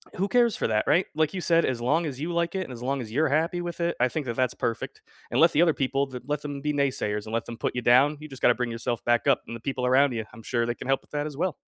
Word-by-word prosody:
who 195 +2 0
cares 240 0 +3
for - - -1
that, 110 -1 +1
right? 180 - +4
Like 155 +1 +1
you 185 - -3
said, 170 -1 +3
as 125 -2 -2
long 160 +8 +1
as 140 -3 -5
you 165 +3 -2
like 170 +1 0
it 190 - 0
and 150 - -10
as 120 - -9
long 135 +1 -1
as 110 -3 -8
you're 155 +7 +2
happy 160 +5 +1
with 175 0 -5
it, 170 0 +1
I 125 - +4
think 150 +2 -3
that 120 -2 -3
that's 130 -1 +1
perfect. 115 - -4 0.3
And - - +1
let 165 +1 +6
the 150 - +3
other 170 -2 +4
people 135 0 -1
let 145 +1 -2
them 145 -1 -5
be 150 +1 0
naysayers, 130 -7 -1
and 110 - -7
let 115 - 0
them 115 - -8
put - - -2
you 125 - -1
down, 130 +5 +4
you 155 - -8
just 135 -2 -11
gotta 120 - +5
bring 125 0 -2
yourself 115 0 -3
back 120 +3 +2
up, 140 - +4
and 115 - -6
the - - -8
people 130 0 -2
around 130 +1 +4
ya, 115 -1 -2
I'm 115 - -12
sure 120 +1 0
they 120 0 -2
can - - -8
help 135 0 +2
with - - -29
that 145 0 -2
as 150 - -8
well. 175 0 0
140 Hz, 325 wpm, -26 LUFS, 120-160 Hz, 0.3 s, let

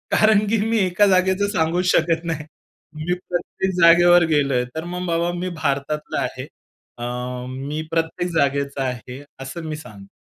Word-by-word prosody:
कारण 215 -1 +4
की 225 +2 +2
मी 230 - +2
एका 185 +3 +3
जागेचं 190 +1 +3
सांगूच 175 +1 0
शकत 165 0 +2
नाही. 160 -3 -3 0.5
मी 160 +4 -2 0.2
प्रत्येक 180 +2 -2
जागेवर 175 +1 +7
गेलोय, 140 -4 +2
तर 160 - -3
मग 180 0 -3
बाबा, 170 +1 0
"मी 185 0 -2
भारतातला 150 +1 -1
आहे. - - -4 0.5
अ, 120 - -5 0.4
मी 140 +4 -4
प्रत्येक 165 +2 -1
जागेचा 140 -2 0
आहे." 125 +1 -5 0.2
असं 135 +5 -6
मी 155 - -3
सांगतो. 100 -9 -12
165 Hz, 155 wpm, -22 LUFS, 140-180 Hz, 0.5 s, जागेवर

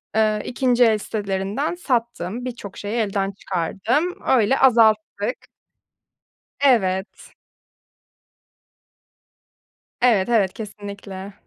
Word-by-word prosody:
ııı, 215 -1 +2
2. 250 -1 +2
el 220 -2 +4
sitelerinden 205 - -3
sattım. 235 - -2
Birçok 230 -6 -7
şeyi 205 +2 -4
elden 200 -3 0
çıkardım. 200 - -1
Öyle 255 +1 +3
azalttık. 220 -2 +2 1.1
Evet. 195 -8 +1 2.7
Evet, 230 -6 +3
evet, 210 -6 +2
kesinlikle. 200 -2 -8
215 Hz, 80 wpm, -22 LUFS, 200-245 Hz, 2.7 s, el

